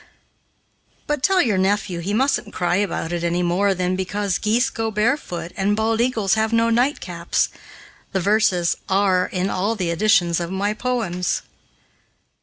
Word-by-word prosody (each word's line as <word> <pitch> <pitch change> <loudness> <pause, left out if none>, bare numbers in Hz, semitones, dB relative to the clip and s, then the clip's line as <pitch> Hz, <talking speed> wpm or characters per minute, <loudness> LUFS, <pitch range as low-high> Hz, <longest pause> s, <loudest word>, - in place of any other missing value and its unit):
"But 295 -2 -2
tell 380 +4 +3
your 210 -7 +1
nephew 195 -2 0
he 180 +4 -3
mustn't 265 +6 0
cry 175 0 +1
about 185 -4 -2
it 170 -1 -2
any 170 +1 0
more 190 +3 +1
than 180 0 -1
because 190 +1 -2
geese 240 +5 +1
go 225 -2 -2
barefoot 210 - -1
and 200 +1 +1
bald 220 +1 +1
eagles 225 -7 +1
have 220 +1 +1
no 230 0 +2
nightcaps. 225 - 0 0.6
The 190 - 0
verses 190 -3 +2
are 190 -1 +2
in 185 +1 -2
all 205 +5 0
the 180 -5 -2
editions 175 -2 +2
of 170 -1 -3
my 200 +3 -1
poems. 215 -7 -2
200 Hz, 155 wpm, -21 LUFS, 180-225 Hz, 0.6 s, tell